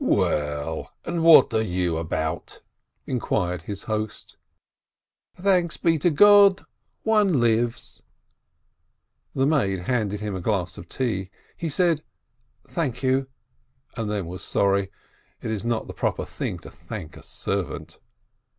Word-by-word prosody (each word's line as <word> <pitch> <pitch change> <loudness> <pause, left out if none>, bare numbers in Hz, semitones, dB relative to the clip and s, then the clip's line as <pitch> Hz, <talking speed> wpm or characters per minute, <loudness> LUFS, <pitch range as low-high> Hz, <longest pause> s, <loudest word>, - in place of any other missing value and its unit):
"Well, 75 +1 0
and 170 -1 -1
what 165 -1 +8
are 110 - +3
you 90 -5 -1
about?" 80 -1 -3 0.4
inquired 90 -8 -1
his 100 +4 -6
host. 110 -1 -4 1.0
"Thanks 180 -3 +1
be 165 -2 +2
to 175 - +3
God, 200 +3 +6 0.4
one 210 -9 +3
lives 115 0 0 0.7
!" - - -48
The 135 - +2
maid 105 - +1
handed 105 0 -1
him 105 -1 -4
a 95 - -4
glass 90 -3 -1
of 85 - -12
tea. 100 -8 -2 0.3
He 165 - -3
said, 165 0 +1 0.6
"Thank 135 -7 -3
you," 130 +1 +2 0.7
and 110 -2 -3
then 105 -3 -2
was 90 +2 -7
sorry: 100 -1 +1 0.5
it 110 - -4
is 110 -2 -3
not 115 -1 -1
the - - -8
proper - - -1
thing - - -4
to - - -9
thank 80 +2 -8
a - - -12
servant. - - -4
110 Hz, 135 wpm, -24 LUFS, 95-155 Hz, 1.0 s, what